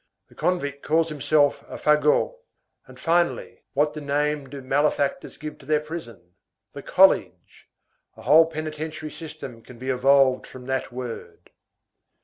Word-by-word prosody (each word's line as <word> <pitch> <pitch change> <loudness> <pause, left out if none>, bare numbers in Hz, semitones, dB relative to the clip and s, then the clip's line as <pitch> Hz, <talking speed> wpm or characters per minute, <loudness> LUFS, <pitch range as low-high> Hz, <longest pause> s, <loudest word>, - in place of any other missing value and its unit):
The - - -19
convict 145 -6 -1
calls 165 +1 +1
himself 145 0 +2
a - - -7
fagot.—And 150 - -1
finally, 170 +1 0
what 150 +2 +1
name 145 -1 -1
do 140 - -8
malefactors 145 +1 0
give 155 0 -8
to 135 - -16
their 155 0 +3
prison? 120 - -9 0.4
The - - -7
college. - - +2 0.5
A - - -12
whole 160 +2 +6
penitentiary 155 0 -5
system 150 -7 -9
can 120 +1 -14
be 130 +2 -3
evolved 130 0 +3
from 125 -1 -11
that 130 0 -2
word. 125 -2 -8
150 Hz, 130 wpm, -24 LUFS, 135-155 Hz, 0.5 s, whole